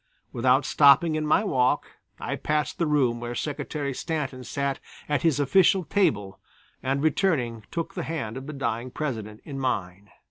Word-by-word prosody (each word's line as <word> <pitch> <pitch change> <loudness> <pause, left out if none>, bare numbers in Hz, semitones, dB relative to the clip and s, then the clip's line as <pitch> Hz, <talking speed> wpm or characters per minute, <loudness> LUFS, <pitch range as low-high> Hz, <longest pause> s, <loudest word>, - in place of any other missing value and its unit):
Without 130 +3 +3
stopping 145 +3 +5
in 155 0 -1
my 155 - +4
walk, 130 -10 +2 0.3
I - - -3
passed 150 0 -1
the 170 - +2
room 130 -6 +2
where 120 0 -5
Secretary 145 -1 -3
Stanton 135 -4 -3
sat 140 +2 -2 0.3
at 145 -1 0
his 160 -4 +2
official 185 +6 +4
table 105 - 0 0.4
and 135 +2 -1
returning 140 - +1
took 165 -1 -4
the - - -3
hand 130 -9 -4
of 130 +1 -7
the 155 - -5
dying 130 -3 -2
President 110 -7 -5
in 140 -2 -6
mine. 100 -6 -3
140 Hz, 165 wpm, -26 LUFS, 120-155 Hz, 0.4 s, stopping